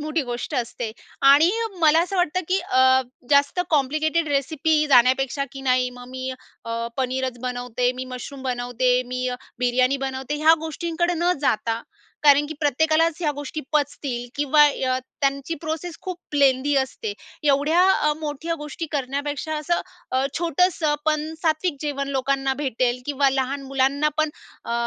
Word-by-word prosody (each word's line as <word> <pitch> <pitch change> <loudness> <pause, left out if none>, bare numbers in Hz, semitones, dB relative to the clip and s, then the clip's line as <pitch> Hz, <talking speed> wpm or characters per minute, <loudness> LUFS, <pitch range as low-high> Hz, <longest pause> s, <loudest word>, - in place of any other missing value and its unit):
मोठी 305 +1 -1
गोष्ट 245 +3 -5
असते. 240 -2 -3 0.4
आणि 300 +5 +6
अ, - - -2
मला 320 0 +5
असं 365 +3 -2
वाटतं 355 0 +1
की 370 +1 +2
अ, 360 -7 -1 0.5
जास्त 285 +4 +3
कॉम्प्लिकेटेड 310 +2 +1
रेसिपी 305 +2 +1
जाण्यापेक्षा 260 +1 +3
की 270 - -8
नाही, 255 -1 +2
मग 245 0 -12
मी 260 0 -5 0.3
अ, 230 0 -3
पनीरच 260 -1 -2
बनवते, 245 -1 -1
मी 255 0 -5
मशरूम 265 +2 -8
बनवते, 250 -1 0
मी 255 +1 -3
अ, 250 - -3 0.2
बिर्याणी 250 +2 +2
बनवते, 265 +2 -4
ह्या 320 +1 +8
गोष्टींकडे 340 +2 -1
न 350 +2 +2
जाता, 225 -3 0 0.4
कारण 290 0 +6
की 315 - -5
प्रत्येकालाच 315 +3 +2
ह्या 310 -4 +1
गोष्टी 290 +2 -5
पचतील 285 -4 -1
किंवा 290 +1 +4
अ, 260 -3 0 0.2
त्यांची 275 +3 0
प्रोसेस 320 +2 -4
खूप 355 -4 -8
लेंदी 280 0 +3
असते. 275 - -1 0.3
एवढ्या 295 +4 +3
अ, 300 -4 +2
मोठ्या 310 +2 -3
गोष्टी 300 +2 -6
करण्यापेक्षा 285 +2 -2
असं 305 +3 0 0.3
अ, 260 +1 +1
छोटंसं, 335 -2 +1
पण 310 0 0
सात्विक 320 0 +1
जेवण 280 -2 -3
लोकांना 270 0 0
भेटेल, 255 -3 -1
किंवा 285 -1 +2
लहान 270 +1 -1
मुलांना 275 +2 +1
पण 310 -1 +2 0.3
अ, - - -4
280 Hz, 150 wpm, -23 LUFS, 260-310 Hz, 0.5 s, ह्या